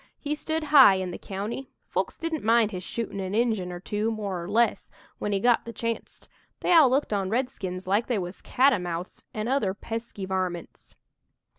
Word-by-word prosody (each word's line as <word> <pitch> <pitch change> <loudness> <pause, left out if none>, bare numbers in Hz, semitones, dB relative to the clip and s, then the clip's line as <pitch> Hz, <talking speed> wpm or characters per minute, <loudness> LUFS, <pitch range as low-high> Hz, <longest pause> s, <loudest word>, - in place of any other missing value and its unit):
He 295 0 -3
stood 315 +1 -2
high 265 -9 +9
in 185 -1 -2
the - - -7
county. 210 +7 -5 0.2
Folks - - -2
didn't 330 -2 -3
mind 225 -1 +4
his 185 - -5
shootin' 225 -2 -4
an' 190 +1 -3
Injun 220 -6 +1
or 175 - -6
two, 210 +4 -1
more 205 -5 -3
or 175 - -7
less, 230 +3 +2 0.3
when 210 - -2
he 200 - +1
got 240 +3 +3
the 230 - -7
chancet. 230 0 -5 0.3
They - - +3
all 315 -6 +8
looked 265 -3 +1
on 195 -2 0
redskins 205 -6 -2
like 200 +5 +1
they 245 - +1
was 180 -1 -5
catamounts 180 -10 0
an' 215 +1 -3
other 245 -8 +1
pesky 225 -2 -5
varmints. 185 -2 -4
215 Hz, 185 wpm, -26 LUFS, 190-240 Hz, 0.3 s, high